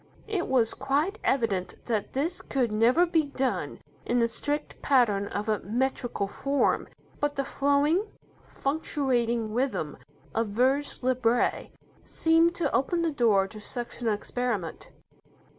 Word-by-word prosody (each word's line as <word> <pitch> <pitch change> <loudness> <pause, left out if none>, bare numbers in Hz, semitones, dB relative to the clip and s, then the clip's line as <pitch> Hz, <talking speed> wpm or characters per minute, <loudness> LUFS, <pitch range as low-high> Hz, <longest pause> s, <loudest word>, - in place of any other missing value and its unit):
It 410 -5 -1
was 245 -4 +2
quite 290 - 0
evident 215 -8 0
that 220 -4 -2
this 320 +7 -1
could 250 -5 -1
never 235 +11 +4
be 325 -3 +1
done 255 - -2 0.3
in 245 - 0
the 230 -1 +3
strict 290 +5 -3
pattern 220 -8 +3
of 205 +2 -4
a 215 -2 +1
metrical 240 -1 -1
form, 275 +7 0 0.3
but 290 0 0
the 275 - -1
flowing, 285 +8 +2 0.4
fluctuating 245 -6 -1
rhythm 260 +3 -1 0.4
of 225 0 0
vers 260 +7 +1
libre 245 -2 +1 0.3
seemed 330 +1 +3
to 320 -6 0
open 335 +6 +1
the 330 - +1
door 220 -8 +3
to 215 +1 -10
such 240 +3 -5
an 235 - -1
experiment. 215 -4 -2
255 Hz, 135 wpm, -27 LUFS, 225-285 Hz, 0.4 s, never